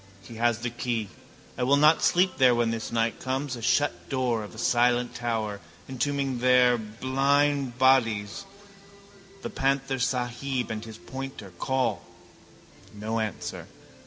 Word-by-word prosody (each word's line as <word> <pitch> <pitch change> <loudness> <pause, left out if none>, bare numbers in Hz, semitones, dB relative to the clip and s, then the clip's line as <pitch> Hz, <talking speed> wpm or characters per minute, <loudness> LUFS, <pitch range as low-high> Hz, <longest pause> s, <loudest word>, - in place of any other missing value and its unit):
He 110 +3 -11
has 120 0 +2
the 120 +1 -4
key. 120 -3 -3 0.5
I - - -1
will 135 +3 +4
not 150 +2 +5
sleep 180 -1 +2
there 125 -2 +6
when 120 -1 +1
this 115 -1 -4
night 115 0 0
comes. 130 +1 -2
A 120 - -8
shut 145 +5 0
door 125 -4 0
of 105 - -10
a - - -12
silent 120 +1 +2
tower, 110 -4 -2 0.3
entombing 135 0 -1
their 125 0 +5
blind 135 +4 0
bodies, 115 - +2 1.0
the - - -4
panthersahib 130 -2 -1
and 110 0 -4
his 110 -1 -9
pointer. 130 -6 -8
Call: 130 -1 0 0.9
no 110 +2 -3
answer. 110 -4 -4
125 Hz, 135 wpm, -27 LUFS, 115-135 Hz, 1.0 s, there